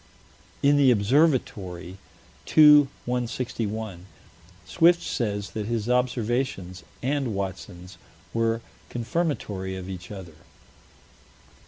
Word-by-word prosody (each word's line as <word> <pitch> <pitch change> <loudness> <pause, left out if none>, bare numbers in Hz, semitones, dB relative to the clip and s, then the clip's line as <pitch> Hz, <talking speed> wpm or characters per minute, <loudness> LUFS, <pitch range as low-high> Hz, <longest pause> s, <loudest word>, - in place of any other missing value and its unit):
In 145 +1 +5
the 140 -2 +5
Observatory, 100 - +1 0.5
2 150 -2 +7 0.2
161, 110 -5 -3 0.6
Swift 170 +1 +4
says 105 -3 -2
that 105 -2 -4
his 115 -2 -2
observations 120 -6 -1 0.2
and 135 -4 -1
Watson's 95 -1 -6 0.3
were 115 0 0 0.3
"confirmatory 115 - -2
of 95 -1 -7
each 95 -2 -8
other." 90 -6 -9
115 Hz, 85 wpm, -25 LUFS, 95-130 Hz, 0.6 s, 2